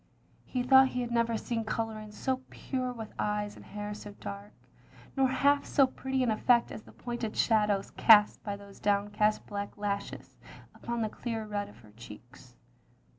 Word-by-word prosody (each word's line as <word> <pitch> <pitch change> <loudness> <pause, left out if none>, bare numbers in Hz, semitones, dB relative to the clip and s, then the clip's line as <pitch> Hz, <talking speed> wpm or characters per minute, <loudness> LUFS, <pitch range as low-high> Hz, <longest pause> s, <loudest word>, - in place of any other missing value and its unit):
He 250 -1 -2
thought 265 +1 +7
he 250 -1 -3
had 240 -1 -4
never 230 -1 +1
seen 230 0 -3
colouring 215 -1 -4
so 260 +4 -2
pure 255 -2 -3
with 225 -3 -8
eyes 210 0 -1
and - - -13
hair 210 0 -6
so 205 0 -9
dark; 200 +1 -7 0.6
nor 270 -1 +4
half 280 +2 +3
so 275 - +4
pretty 265 0 -2
an 240 - +2
effect 235 +2 +3
as - - -7
the - - -16
pointed 240 -2 -5
shadows 210 -3 +2
cast 210 -2 +6
by 205 -1 -3
those 200 0 -14
down 205 0 +1
cast 210 +1 +1
black 200 0 -5
lashes 200 -1 -4 0.4
upon 235 -1 -3
the 215 - -1
clear 225 0 -4
red 205 -1 -3
of 105 - -16
her 105 -2 -17
cheeks. 120 +3 -14
215 Hz, 180 wpm, -30 LUFS, 205-245 Hz, 0.6 s, thought